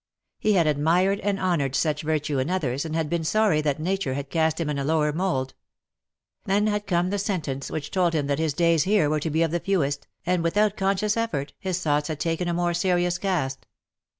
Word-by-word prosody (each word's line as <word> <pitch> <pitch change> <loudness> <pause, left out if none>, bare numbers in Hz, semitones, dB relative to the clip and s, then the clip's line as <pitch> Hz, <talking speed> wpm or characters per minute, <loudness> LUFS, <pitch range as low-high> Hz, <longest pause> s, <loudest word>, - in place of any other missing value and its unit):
He 215 - +2
had 175 -4 +3
admired 170 +7 +2
and 200 -1 -1
honoured 155 -8 0
such 155 +1 0
virtue 150 -2 -1
in 130 - -1
others, 145 -6 -1
and 160 0 -4
had 160 -2 0
been 170 +1 -1
sorry 205 -2 +2
that 150 -1 -1
Nature 175 -5 -1
had 140 0 -5
cast 160 -1 +1
him 165 - -1
in 145 -1 -2
a - - -1
lower 150 0 +1
mould. 160 -7 -1 0.9
Then 200 +2 +2
had 210 -1 -1
come 175 -1 +1
the 205 - -1
sentence 155 -9 -3
which 150 -2 -5
told 180 -3 +2
him 150 -2 +1
that 140 +1 -1
his 160 -3 0
days 170 -1 +3
here 190 -7 +3
were 155 - +1
to 160 - -2
be 160 +2 +2
of 165 - 0
the 175 - 0
fewest, 145 -7 -1 0.2
and, 180 0 +1
without 205 +5 +2
conscious 200 +1 0
effort, 170 -12 -2
his 185 -1 -2
thoughts 150 -1 +1
had 155 -2 -4
taken 165 +1 -1
a 175 - 0
more 175 0 0
serious 175 0 +1
cast. 150 -9 -2
165 Hz, 220 wpm, -25 LUFS, 150-185 Hz, 0.9 s, had